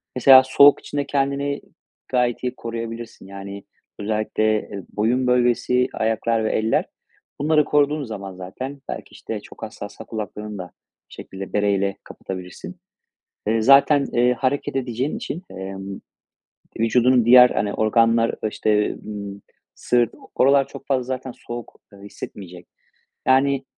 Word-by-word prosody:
Mesela 130 +1 +8
soğuk 140 +2 +6
için 145 - -7
de 140 - 0
kendini 140 0 -1 0.5
gayet 125 -1 0
iyi 125 0 -2
koruyabilirsin. 115 -2 -7
Yani, 100 0 -8 0.4
özellikle, 110 +1 0
eee, 100 -2 -8
boyun 120 +5 0
bölgesi, 125 0 +2
ayaklar 110 0 0
ve - - 0
eller, 110 +1 +1 0.5
bunları 150 0 +3
koruduğun 150 0 +2
zaman 100 -6 -7
zaten 130 +10 -7
belki, - - -6
işte, 110 - -6
çok - - -13
hassassa 110 0 -8
kulaklarını 105 -1 -6
da 90 -2 -8 0.4
bir - - -15
şekilde 95 0 -9
bereyle 100 -1 +1
kapatabilirsin. 90 -1 -8 0.7
Eee, 110 0 +2
zaten, 140 +3 +5
eee, 125 +1 +3
hareket 130 +4 -1
edeceğin 130 - -2
için, 205 -8 -5
emm, 95 +1 -7 0.8
vücudunun 120 +1 +3
diğer, 125 +1 +8
hani, 100 0 -1
organlar, 115 +1 +3
ııı, 110 - -3
işte, 105 0 +1
ımm, 100 -2 -8 0.3
sırt, 120 -2 +1 0.2
oralar 135 +1 +4
çok 135 - -11
fazla 135 -2 +1
zaten 130 0 -5
soğuk, 120 0 -9
ııı, 100 - -15
hissetmeyecek. 90 -3 -10 0.6
Yani, 135 +1 +3
115 Hz, 135 wpm, -22 LUFS, 105-130 Hz, 0.8 s, Mesela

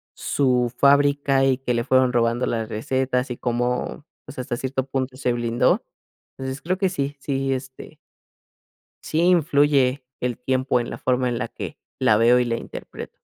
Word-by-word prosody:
su 125 -3 +1
fábrica, 140 0 +4
y 130 -1 +2
que 125 -2 -1
le 115 - 0
fueron 130 -1 +3
robando 120 +1 +1
las 115 -2 -2
recetas, 125 +3 -1
y 120 - -4
cómo, 125 +4 -2 0.2
pues, - - -11
hasta 125 -1 -3
cierto 130 0 -2
punto, 130 -1 -3
se 125 -3 0
blindó. 120 0 +1 0.5
Entonces 130 +1 -5
creo 185 +3 -1
que 190 -1 +1
sí, 145 -5 -3
sí, 135 -1 -1
este 130 0 -8 1.1
sí 155 - -1
influye 145 -6 +3 0.2
el 125 -2 -1
tiempo 130 0 +1
en 120 - -4
la - - -6
forma 125 0 0
en 120 -1 -1
la 115 -1 -3
que - - -7 0.2
la 105 - +4
veo 120 +2 +5
y 125 - +1
la 115 -1 -1
interpreto. - - -8
130 Hz, 170 wpm, -23 LUFS, 125-140 Hz, 1.1 s, veo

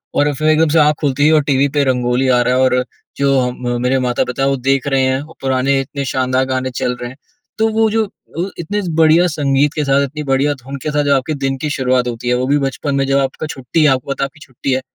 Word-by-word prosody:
और 145 0 +2
फिर 155 +3 -2
एकदम 155 0 +3
से 160 - +3
आँख 150 0 +4
खुलती 145 -1 +1
है 160 - +4
और 155 - +5
टीवी 140 -1 +2
पे 145 - +4
रंगोली 125 0 +1
आ 125 -1 +4
रहा 125 +1 +1
है 130 - +2
और 125 -1 +2 0.3
जो 140 -1 +2
हम 125 -1 -2
मेरे 130 +1 +1
माता-पिता 125 +1 -1
वो 140 - +1
देख 135 +1 0
रहे 135 -1 +2
हैं, 130 +1 +1
और 155 +2 -13
पुराने 135 +1 +1
इतने 140 +1 -5
शानदार 130 0 0
गाने 130 0 -2
चल 125 0 -2
रहे 120 - -4
हैं। 130 - -13 0.4
तो 220 - +2
वो 220 0 +3
जो, 225 0 +2 0.3
वो 185 +3 -2
इतने 205 +5 -2
बढ़िया 165 +2 +5
संगीत 145 -2 +1
के 150 - -1
साथ 140 +1 +3
इतनी 150 +2 -6
बढ़िया 140 +1 +1
धुन 135 +2 -7
के 155 - -2
साथ 145 0 +1
जो 140 -1 +3
आपके 135 +4 -1
दिन 135 0 -1
की 150 +2 -3
शुरुआत 130 -3 0
होती 120 0 -5
है, 125 - +2
वो 130 +1 -1
भी 145 +1 +3
बचपन 140 +1 -2
में 135 - +1
जब 135 - +2
आपका 135 +3 -2
छुट्टी 135 +3 -2
है, - - +5
आपको 135 +1 -1
पता 140 - -2
है - - +2
आपकी 140 +3 -11
छुट्टी 130 0 -5
है 130 - 0
135 Hz, 265 wpm, -17 LUFS, 130-150 Hz, 0.4 s, और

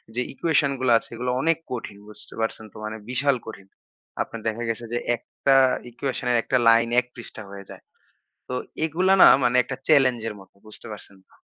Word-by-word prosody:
যে, 125 - 0
ইকুয়েশন 145 -1 +1
গুলা 130 -2 +3
আছে - - -15
এগুলো 125 +2 -2
অনেক 165 +2 +2
কঠিন। 115 -4 -6
বুঝতে 105 - -13
পারছেন 110 0 -3
তো - - -13
মানে 110 +1 -5
বিশাল 135 +2 +2
কঠিন। 100 -3 -10 0.5
আপনার 115 - -5
দেখা 110 +2 -2
গেছে 115 +1 -3
যে, - - +1 0.2
একটা 135 +3 0 0.4
ইকুয়েশন 125 0 -4
এর 120 - +3
১ - - -22
টা 130 - +5
লাইন 115 0 +4
১ 125 - -3
পৃষ্ঠা 115 -2 -9
হয়ে 100 0 -9
যায়। - - -11 0.7
তো - - -4 0.3
এগুলা 180 +5 +2
না - - +11 0.2
মানে 125 0 +2
একটা 130 - -5
চেলেঞ্জ 130 -5 +4
এর 105 - -8
মতো, 95 - -18
বুঝতে 110 - -11
পারছেন 100 -1 -13
তো? - - -27
120 Hz, 200 wpm, -24 LUFS, 110-135 Hz, 0.7 s, না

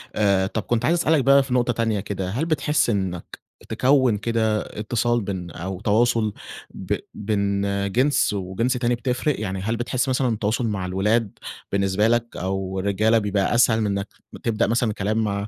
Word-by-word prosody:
آآ، 100 -2 +2
طَب 110 +2 -3
كنت 120 -2 0
عايز 170 +2 +3
أسألك 155 -3 +2
بقى 140 +1 +5
في 135 -2 -4
نقطة 120 -1 +2
تانية 115 -2 0
كده، 95 -2 -4
هل 125 +11 -1
بتحسّ 150 -4 +1
إنك 95 -5 -3 0.3
تكوّن 130 -4 +3
كده 110 0 0 0.2
إتصال 120 +2 0
بين 95 -4 -5
أو 95 +2 -6
تواصل 110 0 +2 0.4
ب - - -3 0.2
بين 100 -1 -1 0.3
جنس 130 +1 +2
وجنس 100 +6 -1
تاني 120 -1 0
بتفرِق، 125 +3 -1
يعني 95 -3 -3
هل 110 +4 -1
بتحس 125 +2 -1
مثلًا 130 0 +1
التواصل 110 +2 -1
مع 100 -4 -2
الولاد 100 +4 0 0.3
بالنسبة 100 +2 +1
لك، 120 0 0
أو 95 +1 -3
الرجّالة 100 +4 +2
بيبقى 105 0 0
أسهل 115 -2 +4
من 105 - +1
إنك 100 0 -2 0.4
تبدأ 115 -1 +1
مثلًا 115 -1 +1
كلام 105 +3 -1
مع 100 -1 -2
110 Hz, 170 wpm, -23 LUFS, 100-120 Hz, 0.4 s, بقى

